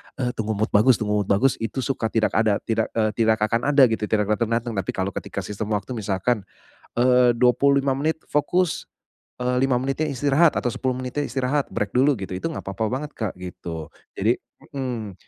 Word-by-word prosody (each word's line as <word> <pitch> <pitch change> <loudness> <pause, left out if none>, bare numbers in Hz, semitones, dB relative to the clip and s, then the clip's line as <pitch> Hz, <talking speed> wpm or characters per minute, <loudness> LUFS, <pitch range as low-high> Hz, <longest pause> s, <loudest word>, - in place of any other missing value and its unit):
eee, 125 -2 -1
"Tunggu 110 -2 -3
mood 110 +3 -1
bagus, 115 +5 +5
tunggu 105 -1 0
mood 100 - -5
bagus." 125 +7 +3
Itu 115 +3 -3
suka 125 -4 -1
tidak 110 -1 +1
ada, 110 -2 +2
tidak 110 -1 0
eee, 110 -1 +2
tidak 110 +1 +3
akan 115 +5 +1
ada 145 -1 +6
gitu, 110 -1 -1
tidak 105 -1 +1
datang-datang. 115 +2 0
Tapi 95 - -2
kalau 95 +1 -1
ketika - - -5
sistem 105 +1 -3
waktu 105 +5 -4
misalkan, 105 -1 -1 0.5
eee, 125 0 +5
25 135 +3 +3
menit 155 +4 -1
fokus, 175 +4 0 0.5
eee, 125 0 0
5 135 -2 +2
menitnya 135 +3 -1
istirahat 145 +5 +3
atau - - -2
10 130 -1 -1
menitnya 130 +3 -3
istirahat, 135 +2 -1
break 105 -1 -2
dulu 135 +3 +5
gitu, 95 -1 -5
itu - - -6
nggak - - -7
apa-apa 100 +3 -2
banget, 145 +3 -3
Kak, 110 -5 -3
gitu. 85 -3 -6 0.3
Jadi - - +2 0.4
mhm. 120 -7 -4
120 Hz, 190 wpm, -23 LUFS, 105-135 Hz, 0.5 s, ada